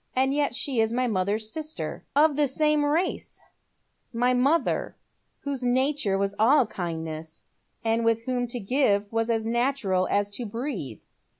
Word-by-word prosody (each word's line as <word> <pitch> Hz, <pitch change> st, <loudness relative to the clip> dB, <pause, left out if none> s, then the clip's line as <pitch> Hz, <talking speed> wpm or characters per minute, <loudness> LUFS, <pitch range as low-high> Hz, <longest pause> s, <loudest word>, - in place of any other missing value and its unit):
And 265 Hz, +1 st, +2 dB
yet 285 Hz, -3 st, 0 dB
she 270 Hz, -2 st, -1 dB
is 220 Hz, 0 st, +1 dB
my 250 Hz, +2 st, +1 dB
mother's 215 Hz, 0 st, -1 dB
sister, 310 Hz, 0 st, -5 dB
of 300 Hz, 0 st, +4 dB
the 295 Hz, 0 st, +3 dB
same 300 Hz, +2 st, +2 dB
race; 320 Hz, +5 st, -1 dB, 0.7 s
my 245 Hz, +2 st, +2 dB
mother, 275 Hz, +4 st, +1 dB, 0.5 s
whose 280 Hz, -2 st, -3 dB
nature 255 Hz, -4 st, +1 dB
was 200 Hz, 0 st, 0 dB
all 255 Hz, +5 st, +5 dB
kindness, 160 Hz, -4 st, -6 dB, 0.4 s
and 225 Hz, +1 st, +2 dB
with 230 Hz, 0 st, +2 dB
whom 245 Hz, 0 st, -1 dB
to 240 Hz, +1 st, -4 dB
give 205 Hz, -3 st, +1 dB
was 225 Hz, 0 st, 0 dB
as 225 Hz, -1 st, 0 dB
natural 230 Hz, -6 st, +1 dB
as 205 Hz, 0 st, +1 dB
to 235 Hz, +4 st, -5 dB
breathe." 210 Hz, -, -5 dB
240 Hz, 155 wpm, -26 LUFS, 205-275 Hz, 0.7 s, all